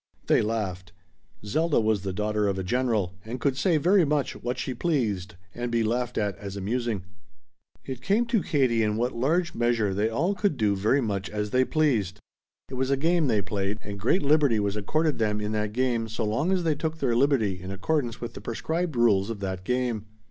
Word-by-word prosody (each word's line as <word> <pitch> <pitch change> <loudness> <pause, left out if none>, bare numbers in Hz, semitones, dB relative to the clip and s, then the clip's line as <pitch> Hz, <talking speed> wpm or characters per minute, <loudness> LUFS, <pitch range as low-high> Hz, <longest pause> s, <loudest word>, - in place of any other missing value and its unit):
They - - +4
laughed. 95 -5 -3 0.5
Zelda 155 +8 +2
was 110 -3 +1
the 95 0 -3
daughter 105 +1 0
of 100 -1 0
a 95 - -2
general, 110 -3 0
and 120 +4 -6
could 140 -1 +1
say 165 +4 +2
very 180 +5 +4
much 150 -3 0
what 125 +1 -2
she 130 - -3
pleased 115 - -1 0.2
and 120 0 -4
be 115 -1 +2
laughed 120 +2 -1
at 105 -2 0
as 100 -1 -6
amusing. 110 0 -2 0.8
It 130 -2 -6
came 210 - +2
to 230 -3 +1
Katie 130 -8 +2
in 105 -1 +1
what 120 +3 0
large 165 +8 +1
measure 115 -4 +1
they 105 +3 +1
all 165 - 0
could 195 -6 0
do 105 -3 +2
very 110 +8 +2
much 100 -4 -2
as 105 -1 -3
they 130 0 +4
pleased. 120 - +1 0.5
It - - -11
was 130 +1 -1
a 140 - +2
game 165 +2 +2
they 105 -5 +2
played, 100 +2 -2
and 100 0 -7
great 125 - +2
liberty 145 -6 +4
was 100 0 -1
accorded 155 +9 0
them 105 -1 +1
in 105 0 -2
that 105 -1 -1
game 120 -1 0
so 110 +1 -2
long 115 - 0
as 185 -2 +1
they 160 -2 +2
took 160 +2 -3
their 120 -6 +1
liberty 115 -8 +2
in 95 - -7
accordance 115 +5 -1
with 120 - -6
the - - -9
prescribed 160 +7 -2
rules 110 -4 +3
of 115 -3 -4
that 95 -1 -3
game. 120 -2 -1
115 Hz, 210 wpm, -26 LUFS, 105-140 Hz, 0.8 s, They